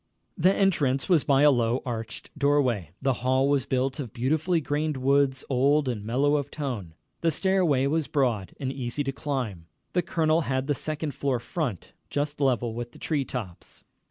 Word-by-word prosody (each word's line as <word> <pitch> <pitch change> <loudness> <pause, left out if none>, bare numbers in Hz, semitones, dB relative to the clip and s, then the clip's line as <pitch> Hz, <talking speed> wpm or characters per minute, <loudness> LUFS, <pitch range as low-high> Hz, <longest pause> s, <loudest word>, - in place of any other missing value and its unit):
The 185 0 +4
entrance 145 -10 +1
was 170 -6 +4
by 140 0 +3
a 150 - +7
low, 120 -1 +1
arched 115 -3 -5
doorway. 140 - +1
The 135 -1 +3
hall 130 +2 +2
was 140 -2 +1
built 130 +2 0
of 125 -6 -5
beautifully 155 +8 +1
grained 150 0 -1
woods, 135 0 +2
old 140 +2 +3
and 115 -5 -2
mellow 140 +7 +2
of 145 -1 -3
tone. 120 - -5 0.2
The 170 - +2
stairway 170 -5 +2
was 155 +1 0
broad 120 - 0
and 135 -1 -2
easy 130 +2 -2
to 135 - -2
climb. 125 - -4 0.3
The 180 - +3
colonel 160 -1 +1
had 130 -3 -1
the 145 - +1
second 155 +1 -3
floor 135 0 0
front, 120 - -4 0.2
just 145 +1 -2
level 125 -4 +1
with 120 +1 -6
the - - -13
tree 145 -4 -1
tops. 105 -11 -7
135 Hz, 180 wpm, -26 LUFS, 125-150 Hz, 0.3 s, a